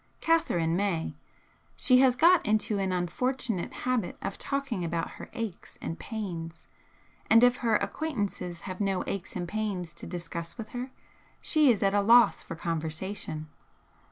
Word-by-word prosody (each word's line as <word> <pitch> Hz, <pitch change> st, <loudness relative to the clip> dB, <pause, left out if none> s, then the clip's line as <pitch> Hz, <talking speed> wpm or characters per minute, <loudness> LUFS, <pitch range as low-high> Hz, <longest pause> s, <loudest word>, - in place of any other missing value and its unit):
Catherine 175 Hz, -, +2 dB
may 185 Hz, -4 st, 0 dB, 0.6 s
she 255 Hz, -1 st, +5 dB
has 260 Hz, -2 st, +5 dB
got 340 Hz, +5 st, +6 dB
into 215 Hz, -1 st, +1 dB
an 190 Hz, -1 st, 0 dB
unfortunate 190 Hz, +3 st, -1 dB
habit 250 Hz, -7 st, 0 dB
of 195 Hz, -, -5 dB
talking 275 Hz, -9 st, -2 dB
about 170 Hz, 0 st, -2 dB
her -, -, -10 dB
aches 225 Hz, -7 st, -6 dB
and 165 Hz, -, -5 dB
pains, 170 Hz, -7 st, -6 dB, 0.6 s
and 230 Hz, +2 st, +7 dB
if 245 Hz, 0 st, +5 dB
her 230 Hz, -2 st, +2 dB
acquaintances 200 Hz, -, -2 dB
have 185 Hz, +1 st, -6 dB
no 195 Hz, -2 st, 0 dB
aches 195 Hz, -2 st, -4 dB
and 175 Hz, -2 st, -3 dB
pains 190 Hz, -5 st, -3 dB
to 170 Hz, -, -5 dB
discuss 170 Hz, 0 st, -6 dB
with 225 Hz, -2 st, -7 dB
her 250 Hz, +1 st, -5 dB, 0.5 s
she 305 Hz, -3 st, +4 dB
is 220 Hz, -5 st, +3 dB
at 195 Hz, 0 st, +3 dB
a 205 Hz, -, +4 dB
loss 235 Hz, +4 st, +6 dB
for 165 Hz, -, -7 dB
conversation. 160 Hz, 0 st, -3 dB
200 Hz, 155 wpm, -29 LUFS, 175-245 Hz, 0.6 s, and